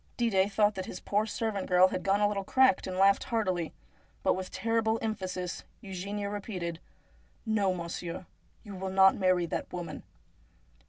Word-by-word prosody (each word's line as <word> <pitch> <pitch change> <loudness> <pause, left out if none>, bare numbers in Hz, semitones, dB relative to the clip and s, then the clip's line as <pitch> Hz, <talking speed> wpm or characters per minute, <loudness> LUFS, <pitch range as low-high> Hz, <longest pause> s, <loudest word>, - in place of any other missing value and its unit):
Didet 205 -4 +2
thought 210 +1 +3
that 190 -1 -5
his - - -6
poor 205 - 0
old - - -7
servant 215 -3 -2
had 185 0 +4
got 195 +1 +2
a 205 - +5
little 200 -1 -2
cracked, 260 +4 +3
and 185 -1 -4
laughed 195 +1 +4
heartily. 185 -8 -1 0.5
But - - +4
with 185 0 -4
terrible 225 -1 0
emphasis 185 -5 -3 0.2
Eugenia 200 0 -4
repeated: 185 -5 -4 0.4
' - - -34
No, 195 -2 +3
monsieur, 170 +1 -5 0.4
you 200 -4 -8
shall 190 0 -3
not 190 0 +6
marry 185 -2 +2
that - - -4
woman.' 170 -4 -5
190 Hz, 165 wpm, -30 LUFS, 180-210 Hz, 0.5 s, not